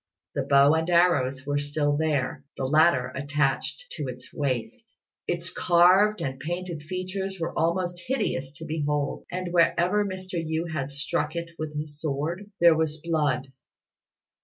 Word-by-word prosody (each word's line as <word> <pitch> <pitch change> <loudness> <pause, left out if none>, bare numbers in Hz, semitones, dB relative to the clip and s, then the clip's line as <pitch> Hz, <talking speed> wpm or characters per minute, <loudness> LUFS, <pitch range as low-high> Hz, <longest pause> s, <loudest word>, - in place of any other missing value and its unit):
The - - 0
bow 140 +1 +5
and 160 +2 0
arrows 140 -7 +3
were 145 0 0
still 145 0 0
there, 145 -3 0
the 135 - -1
latter 150 -3 +4
attached 145 - -1
to 150 -4 -3
its 125 0 -8
waist. 220 - -3 0.3
Its 170 0 -2
carved 185 +5 +4
and 130 -1 -3
painted 175 +1 -4
features 185 +3 -4
were 165 - -2
most 175 +1 0
hideous 135 - -1
to 160 +2 -9
behold; 150 -2 -2
and 180 -1 -4
wherever 175 +4 +3
Mr. 185 -3 -4
Yü 160 +1 -2
had 140 -3 -2
struck 145 +2 -2
it 170 0 -4
with 155 -1 -4
his 150 0 -6
sword, 160 +7 -3
there 170 -1 +7
was 155 -1 0
blood. 150 -5 0
160 Hz, 150 wpm, -26 LUFS, 145-175 Hz, 0.3 s, there